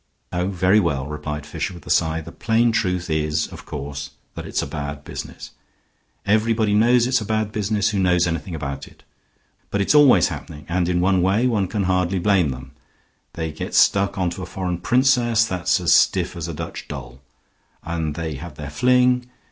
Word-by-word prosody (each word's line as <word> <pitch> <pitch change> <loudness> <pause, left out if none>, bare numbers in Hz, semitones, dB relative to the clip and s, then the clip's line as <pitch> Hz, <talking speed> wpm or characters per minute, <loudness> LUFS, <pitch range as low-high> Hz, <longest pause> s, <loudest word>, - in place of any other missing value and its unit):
"Oh, 90 +1 0
very 95 +2 +3
well," 70 -8 0
replied 75 0 -5
Fisher, 95 - -4
with 85 - -13
a - - -4
sigh; 80 -1 +2
"the 80 +2 -10
plain 115 +3 +1
truth 90 -6 -1
is, 75 -1 0
of - - -12
course, 70 0 -6 0.2
that - - -7
it's - - -1
a - - -3
bad 70 -1 -5
business. - - -8 0.7
Everybody 110 0 +2
knows 120 +3 +4
it's 125 -1 +1
a - - -2
bad 110 0 -1
business 105 0 0
who 100 - -1
knows 90 -2 +3
anything 85 0 -3
about 70 -3 -5
it. - - -19 0.7
But 100 - -1
it's 100 - +2
always 140 - +6
happening, 75 -1 -8
and 85 0 0
in 90 -1 +1
one 95 0 +3
way 100 +7 +2
one 105 -6 +1
can 105 +1 -2
hardly 90 0 +1
blame 95 -4 +2
them. 65 0 -7 0.6
They 80 -1 -3
get 75 - -6
stuck 100 0 +3
on 90 -2 0
to 90 - -7
a - - -6
foreign 90 -2 -3
princess 120 0 +3
that's 90 -5 0
as - - +3
stiff - - +3
as 85 -1 -5
a 85 - -5
Dutch 80 +1 -7
doll, 65 -3 -8 0.6
and 80 -3 -3
they 80 -1 -4
have 80 0 -9
their 75 0 -7
fling. 125 +5 +3
90 Hz, 195 wpm, -22 LUFS, 80-110 Hz, 0.7 s, always